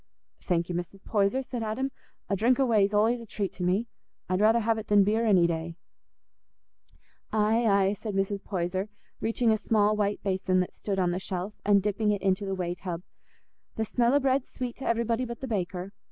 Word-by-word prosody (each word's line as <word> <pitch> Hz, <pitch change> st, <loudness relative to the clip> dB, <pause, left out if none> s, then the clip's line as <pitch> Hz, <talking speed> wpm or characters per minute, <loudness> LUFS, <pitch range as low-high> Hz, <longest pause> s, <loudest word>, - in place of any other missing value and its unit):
"Thank 170 Hz, -2 st, 0 dB
you, 180 Hz, -, -4 dB
Mrs. 175 Hz, +3 st, -5 dB
Poyser," 210 Hz, +5 st, +1 dB
said 250 Hz, -2 st, -5 dB
Adam; 230 Hz, +5 st, -2 dB, 0.4 s
"a 200 Hz, -, 0 dB
drink 240 Hz, +7 st, +2 dB
o' 270 Hz, -, +4 dB
whey's 210 Hz, -4 st, +3 dB
allays 225 Hz, +3 st, +2 dB
a 230 Hz, -, -11 dB
treat 200 Hz, -2 st, -3 dB
to 180 Hz, -, -5 dB
me. 185 Hz, +6 st, +1 dB, 0.4 s
I'd 185 Hz, +2 st, 0 dB
rather 225 Hz, +2 st, +5 dB
have 225 Hz, 0 st, +1 dB
it 220 Hz, -, -8 dB
than 205 Hz, -1 st, +5 dB
beer 220 Hz, +3 st, +1 dB
any 185 Hz, -5 st, +5 dB
day." 165 Hz, 0 st, -2 dB, 1.6 s
"Aye, 220 Hz, +2 st, +2 dB
aye," 200 Hz, -1 st, +3 dB
said 210 Hz, 0 st, -5 dB
Mrs. 195 Hz, +1 st, -1 dB
Poyser, 185 Hz, +1 st, -2 dB, 0.3 s
reaching 230 Hz, +1 st, +1 dB
a 220 Hz, -, +3 dB
small 215 Hz, -1 st, +2 dB
white 205 Hz, -1 st, -1 dB
basin 185 Hz, -1 st, +1 dB
that 180 Hz, -, -4 dB
stood 200 Hz, -2 st, -3 dB
on 180 Hz, -2 st, +2 dB
the 180 Hz, -, -2 dB
shelf, 190 Hz, +1 st, -4 dB
and 200 Hz, -1 st, +4 dB
dipping 210 Hz, +1 st, 0 dB
it 205 Hz, -2 st, 0 dB
into 195 Hz, +1 st, +1 dB
the 195 Hz, -, -1 dB
whey 175 Hz, -2 st, -2 dB
tub, 180 Hz, -1 st, -6 dB, 0.7 s
"the 220 Hz, -, -1 dB
smell 235 Hz, +4 st, +2 dB
o' -, -, +5 dB
bread's 270 Hz, -1 st, +1 dB
sweet 245 Hz, -2 st, -4 dB
t' 270 Hz, -, -7 dB
everybody 230 Hz, +1 st, +1 dB
but 235 Hz, -2 st, -5 dB
the 265 Hz, -, -5 dB
baker. 190 Hz, -3 st, -3 dB
205 Hz, 205 wpm, -28 LUFS, 190-225 Hz, 1.6 s, rather